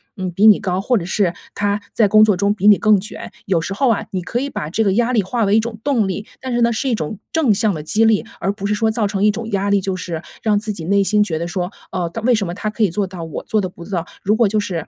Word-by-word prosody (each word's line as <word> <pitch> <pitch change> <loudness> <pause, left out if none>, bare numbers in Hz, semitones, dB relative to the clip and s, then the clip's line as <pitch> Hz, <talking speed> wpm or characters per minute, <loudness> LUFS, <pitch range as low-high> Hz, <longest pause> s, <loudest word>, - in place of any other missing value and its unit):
嗯， 185 -2 -4
比 200 +5 +4
你 215 - +7
高， 190 -3 -1
或 245 +4 +2
者 175 - -3
是 185 -2 0 0.2
他 205 0 -1
在 220 - +3
工 215 +2 +6
作 210 -2 +4
中 200 +2 +2
比 205 0 +1
你 205 - +8
更 215 -3 +4
卷， 210 +4 -8
有 175 -4 +1
时 195 - -4
候 260 +5 +1
啊， 225 - 0
你 185 - -2
可 210 +7 -3
以 280 +2 -3
把 150 - -5
这 220 +7 0
个 195 -3 +2
压 240 +3 +1
力 225 - +3
化 225 +4 -1
为 200 +2 +3
一 - - +5
种 220 -1 -4
动 250 -8 +1
力。 195 +2 -4 0.2
但 260 -1 -4
是 240 - +1
呢， 235 - +4
是 265 +4 -1
一 240 - +2
种 190 +2 -5
正 305 -9 +3
向 210 0 +1
的 155 - -5
激 210 +8 +1
励， 220 -2 +3
而 195 - 0
不 200 0 -7
是 210 - +1
说 220 +1 +1
造 220 -1 0
成 200 0 -2
一 210 - +5
种 230 +1 -6
压 200 0 0
力， 200 0 +3
就 190 0 -2
是 170 -3 -5 0.2
让 215 -2 +2
自 210 0 -3
己 165 -5 -7
内 200 +3 +3
心 210 +1 +3
觉 160 -6 -3
得 170 - -3
说， 180 +1 -3 0.2
“哦， 175 -2 -2
他 225 - -5
为 245 +3 +3
什 210 -5 0
么 170 - -4
他 215 +3 -3
可 215 +1 -1
以 205 - +3
做 200 +4 -1
到 180 -3 -8
我 160 - -6
做 215 -1 0
得 185 - -3
不 170 -1 -12
到。” 175 -4 -3 0.2
如 210 +3 +2
果 230 -1 +3
就 210 +2 0
是 180 -6 -4
205 Hz, 340 characters per minute, -19 LUFS, 185-220 Hz, 0.2 s, 你